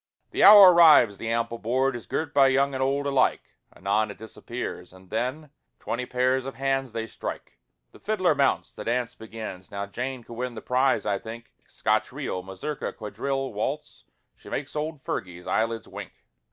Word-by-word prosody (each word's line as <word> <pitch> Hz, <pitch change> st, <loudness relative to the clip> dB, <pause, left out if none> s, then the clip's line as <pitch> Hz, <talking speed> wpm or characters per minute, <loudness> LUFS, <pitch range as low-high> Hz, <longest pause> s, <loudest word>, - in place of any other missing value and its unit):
The -, -, +1 dB
hour 200 Hz, -3 st, +11 dB
arrives, 150 Hz, -, +6 dB
the 115 Hz, -, -4 dB
ample 115 Hz, 0 st, -1 dB
board 130 Hz, +3 st, 0 dB
Is 115 Hz, -6 st, -8 dB
girt 160 Hz, +8 st, -3 dB
by 140 Hz, -1 st, +6 dB
young 135 Hz, +1 st, +2 dB
and 130 Hz, -, -3 dB
old 140 Hz, +2 st, 0 dB
alike, 135 Hz, -2 st, +1 dB, 0.2 s
Anon 105 Hz, +3 st, 0 dB
it 100 Hz, -, -9 dB
disappears, 110 Hz, -3 st, -7 dB
and 95 Hz, 0 st, -17 dB
then 130 Hz, +7 st, -3 dB, 0.3 s
Twenty 125 Hz, +1 st, -3 dB
pairs 130 Hz, +1 st, +1 dB
of 135 Hz, +1 st, -7 dB
hands 135 Hz, -1 st, -1 dB
they 115 Hz, 0 st, -3 dB
strike, 115 Hz, -, -7 dB, 0.3 s
The -, -, -17 dB
fiddler 185 Hz, -6 st, +1 dB
mounts, 140 Hz, -2 st, +1 dB
the -, -, -8 dB
dance 120 Hz, +1 st, -1 dB
begins, 110 Hz, -5 st, -8 dB
Now 100 Hz, 0 st, -4 dB
Jane 125 Hz, +4 st, -5 dB
could 120 Hz, -, -11 dB
win 125 Hz, +1 st, -4 dB
the 110 Hz, -, -7 dB
prize, 130 Hz, +1 st, +2 dB
I 100 Hz, -2 st, 0 dB
think, 115 Hz, +2 st, -10 dB
Scotch -, -, 0 dB
reel, 90 Hz, -, -4 dB
mazurka, 95 Hz, +11 st, -5 dB
quadrille, 135 Hz, +4 st, -3 dB
waltz, 135 Hz, +9 st, -4 dB, 0.3 s
She -, -, -14 dB
make's 140 Hz, +1 st, -4 dB
old 150 Hz, -1 st, -4 dB
Fergie's 90 Hz, -1 st, -5 dB
eyelids 115 Hz, 0 st, -1 dB
wink. -, -, -9 dB
125 Hz, 180 wpm, -26 LUFS, 110-135 Hz, 0.3 s, hour